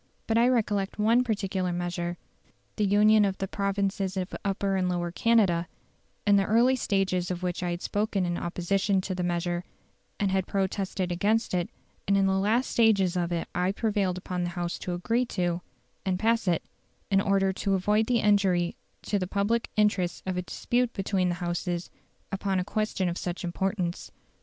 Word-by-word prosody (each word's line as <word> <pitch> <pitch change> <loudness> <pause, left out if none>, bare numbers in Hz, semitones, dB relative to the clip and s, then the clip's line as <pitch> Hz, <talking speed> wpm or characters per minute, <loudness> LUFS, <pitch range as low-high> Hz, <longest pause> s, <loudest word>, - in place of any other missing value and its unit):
But 225 - 0
I 235 +1 +5
recollect 210 -5 0
one 225 +4 +4
particular 195 -5 -1
measure, 175 0 -3 0.6
the 210 - +1
union 210 +2 +5
of 195 -1 0
the 195 - -3
provinces 195 -1 -1
of 185 0 -3
Upper 195 0 0
and 185 -1 +1
Lower 175 -1 -1
Canada, 185 -5 +2 0.6
in 205 -1 +5
the 195 - +2
early 235 +5 +4
stages 190 -6 0
of 180 0 -4
which 180 -1 -2
I 180 - -1
had 175 +1 -4
spoken 205 -2 0
in 175 0 -1
opposition 190 +3 0
to 185 - -3
the 180 - -3
measure, 175 0 -1 0.6
and 200 -2 +1
had 190 -1 0
protested 190 -1 -1
against 210 +6 +1
it; 175 -1 0 0.4
and 200 0 +3
in 195 - +3
the 190 - +2
last 220 +6 +1
stages 200 -6 +3
of 175 -1 -1
it 170 -1 -2
I 180 +2 +1
prevailed 200 -4 0
upon 180 -1 -3
the 175 - -1
House 175 0 -2
to 180 - -3
agree 230 +8 0
to, 175 -1 0 0.4
and 185 -1 0
pass 225 +1 +1
it, 170 -2 +2 0.5
in 195 0 +4
order 195 -1 +2
to 195 +1 0
avoid 210 +4 +2
the 240 -2 +2
injury 190 -4 +2 0.3
to 205 - 0
the 185 - -2
public 205 +4 0
interests 205 -5 +1
of 185 -1 -2
a 180 - -1
dispute 240 +6 -1
between 190 -2 0
the 175 - -1
Houses 175 0 -2 0.4
upon 195 -1 0
a 180 - -2
question 215 -2 -1
of 175 0 -2
such 175 +1 -4
importance. 180 0 -2
195 Hz, 185 wpm, -27 LUFS, 180-210 Hz, 0.6 s, I